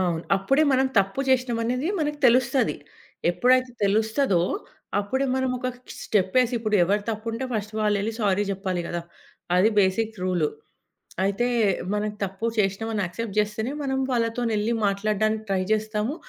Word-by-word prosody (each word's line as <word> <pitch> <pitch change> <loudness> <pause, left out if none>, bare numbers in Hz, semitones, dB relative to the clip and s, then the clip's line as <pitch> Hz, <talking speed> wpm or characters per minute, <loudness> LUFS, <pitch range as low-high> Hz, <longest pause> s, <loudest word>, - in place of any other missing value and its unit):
అవును. 170 -3 0
అప్పుడే 270 +10 +2
మనం 265 0 +3
తప్పు 195 +7 +1
చేసినామనేది 250 +2 +1
మనకి 295 -1 -1
తెలుస్తది. 255 +2 +3 0.5
ఎప్పుడైతే 255 +6 +3
తెలుస్తదో, 220 -1 +2 0.6
అప్పుడే 265 +7 -1
మనం 260 -1 0
ఒక 255 - -2 0.3
స్టెప్పేసి, 220 +5 +2
ఇప్పుడెవరు 205 -2 +2
తప్పుంటే, 225 +3 -4
ఫస్ట్ 215 -1 -3
వాళ్ళెళ్లి 210 +1 +1
సారీ 205 -1 +2
చెప్పాలి 190 -2 -2
కదా! 175 - -3 0.6
అది 190 +4 +5
బేసిక్ 210 +3 +2
రూలు. 175 -5 +1 0.8
అయితే, 200 +5 +1 0.5
మనం 210 0 -1
తప్పు 195 +4 -4
చేసినామని 210 +2 0
యాక్సెప్ట్ 195 +4 -5
జేస్తేనే 210 +4 0
మనం 265 -1 -1
వాళ్ళతో 235 -1 0
నేళ్లి 215 +1 0
మాట్లాడడానికి 215 +2 0
ట్రై 190 -1 +1
జేస్తాము, 215 +3 -1
215 Hz, 130 wpm, -25 LUFS, 195-245 Hz, 0.8 s, అది